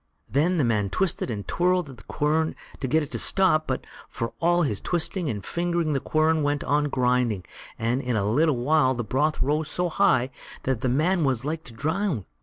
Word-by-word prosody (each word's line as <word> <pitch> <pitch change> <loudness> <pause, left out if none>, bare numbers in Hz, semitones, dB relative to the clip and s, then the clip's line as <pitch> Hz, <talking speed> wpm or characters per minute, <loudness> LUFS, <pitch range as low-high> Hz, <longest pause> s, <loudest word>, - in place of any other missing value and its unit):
Then 165 +7 +1
the 150 - +2
man 105 -4 +1
twisted 185 - -1
and 105 -4 -5
twirled 180 -1 +1
at 135 -3 -11
the 105 - -14
quern 155 +2 0 0.2
to 135 - -2
get 155 +4 +2
it 145 - -8
to - - -2
stop, 180 -5 +3
but 130 - -2 0.2
for 115 -1 -4
all 175 +1 +3
his 105 -9 -1
twisting 175 -1 -1
and 105 -5 -4
fingering 170 -2 -1
the 135 - +1
quern 155 +3 +1
went 145 0 0
on 145 +1 +1
grinding, 125 - +1 0.3
and 120 +4 0
in 125 -3 -2
a 100 -2 0
little 145 +5 +2
while 130 +1 +3
the 120 - -2
broth 145 +8 0
rose 150 +2 0
so 175 +2 -1
high 130 -5 +2 0.3
that 130 -4 -1
the 130 - 0
man 165 +7 +2
was 130 -3 0
like 160 +2 -3
to 120 - -10
drown. 160 - -1
145 Hz, 210 wpm, -25 LUFS, 125-160 Hz, 0.3 s, stop